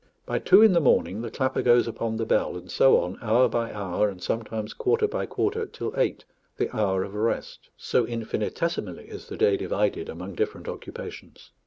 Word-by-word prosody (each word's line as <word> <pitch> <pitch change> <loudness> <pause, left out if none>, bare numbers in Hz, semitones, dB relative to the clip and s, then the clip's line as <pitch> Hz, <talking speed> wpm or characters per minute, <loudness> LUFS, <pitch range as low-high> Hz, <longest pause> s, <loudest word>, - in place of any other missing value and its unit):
By - - -1
two 215 - +6
in 220 -4 +7
the 170 - +4
morning 110 -6 +2
the 115 - -4
clapper 130 +3 -1
goes 120 -1 +4
upon 115 -1 -3
the 115 - -1
bell, 100 - +1
and 90 +1 -10
so 135 - +5
on, 90 +2 -3
hour 120 +3 +4
by 115 0 -2
hour, 100 0 0
and 95 -2 -9
sometimes 110 +1 -3
quarter 430 +2 +1
by 430 - -3
quarter, 440 +1 -1
till - - -5
eight, - - 0 0.3
the - - -2
hour 95 -4 +1
of 100 - -8
rest; 110 +2 -2
so - - +1
infinitesimally 115 +8 -3
is - - -9
the - - -7
day 435 -2 +3
divided 405 0 -1
among - - -7
different 435 0 -3
occupations. - - -9
115 Hz, 190 wpm, -26 LUFS, -, 0.3 s, in